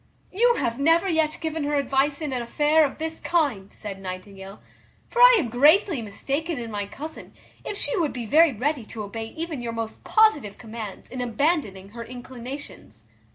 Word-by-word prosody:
"You 475 +5 +3
have 235 - -1
never 330 +6 +4
yet 320 -3 +1
given 320 -1 -2
her 295 0 0
advice 280 +2 +1
in 295 -3 -3
an 250 - -1
affair 295 +6 +3
of 275 - -5
this 320 +1 -4
kind," 275 - 0
said 195 -2 -8
Nightingale; 190 +1 -8 0.5
"for 480 - -4
I - - +10
am 290 - 0
greatly 295 - +4
mistaken 275 +10 -3
in 230 -2 -5
my 205 -1 -3
cousin, 300 +9 -9 0.3
if 405 - -4
she - - 0
would 315 -4 +1
be 245 -2 -5
very 315 +7 +5
ready 265 +3 -1
to 215 0 -7
obey 225 +2 -5
even 320 0 -5
your 235 -1 -4
most 225 -1 -5
positive 295 - +3
commands 220 -3 -8
in 255 0 -4
abandoning 240 - -1
her 230 +2 -8
inclinations." 245 - -9
270 Hz, 180 wpm, -25 LUFS, 225-315 Hz, 0.5 s, I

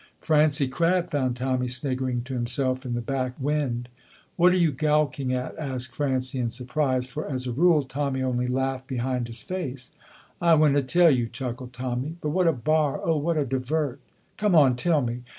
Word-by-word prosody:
Francie 150 -2 +3
Crabb 170 +6 +1
found 130 -4 0
Tommy 130 0 -1
sniggering 130 -1 -1
to 130 +1 -7
himself 130 +1 0
in 120 - -2
the 120 - -2
back 130 0 -2
wynd. 135 -4 -1 0.5
"What 180 +1 +5
are 185 - +2
you 170 -4 +3
goucking 145 -2 0
at?" 125 0 -3
asked 130 -4 -4
Francie, 130 -2 -1
in 120 -2 0
surprise, 130 +1 -1
for, 150 +5 -5
as 130 -2 -2
a 125 - -2
rule, 155 +3 +4
Tommy 135 0 -2
only 125 -1 0
laughed 130 +1 -2
behind 125 -1 -2
his 115 -2 -3
face. 135 -9 -5 0.5
"I 170 -1 +5
winna 150 -2 +4
tell 170 +5 +4
you," 120 -4 +1
chuckled 125 0 -6
Tommy, 125 +4 -3
"but 150 - -3
what 180 +3 +2
a - - +6
bar, 150 +1 0
oh, 165 -1 +1
what 160 +2 0
a 145 - +1
divert!" 135 +2 -2 0.4
"Come 210 -4 +2
on, 135 -5 +6
tell 150 +2 +1
me." 120 +1 -3
130 Hz, 185 wpm, -25 LUFS, 125-150 Hz, 0.5 s, a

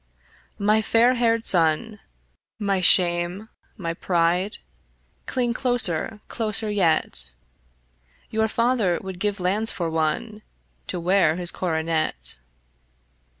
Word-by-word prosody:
My 210 +2 +2
fair 230 +3 +3
haired 230 -2 0
son, 180 +5 +1 0.6
my 200 -3 -1
shame, 175 +3 +3 0.3
my 170 -5 -4
pride, 175 +3 0 0.7
Cling 245 -2 -1
closer, 225 -6 +3
closer 215 -1 -2
yet: 155 - +1 1.0
Your 220 0 +1
father 230 -6 0
would 190 -2 -8
give 205 0 -1
his 195 - -11
lands 205 +5 +1
for 170 -3 -3
one 165 +8 -2 0.5
To - - -3
wear 175 -2 +2
his 175 0 0
coronet. 160 - -1
190 Hz, 105 wpm, -23 LUFS, 170-220 Hz, 1.0 s, fair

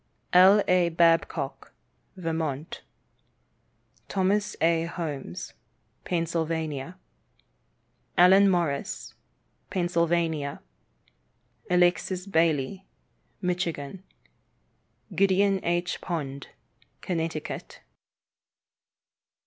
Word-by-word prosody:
L. 190 +3 +7
A. 180 -1 +3
Babcock, 165 -4 +1 0.4
Vermont. 160 -3 -3 1.3
Thomas 200 +2 0
A. 165 0 +2
Holmes, 150 - -5 0.5
Pennsylvania. 165 -2 -2 1.2
Allen 190 +3 +7
Morrison, 170 -6 -2 0.5
Pennsylvania. 170 -5 0 1.1
Alexis 180 +1 +2
Bailly, 165 0 +1 0.6
Michigan. 175 -2 -2 1.1
Gideon 195 +1 +2
H. 175 +1 -1
Pond, 140 -6 -4 0.5
Connecticut. 165 -3 -4
170 Hz, 55 wpm, -27 LUFS, 160-180 Hz, 1.3 s, L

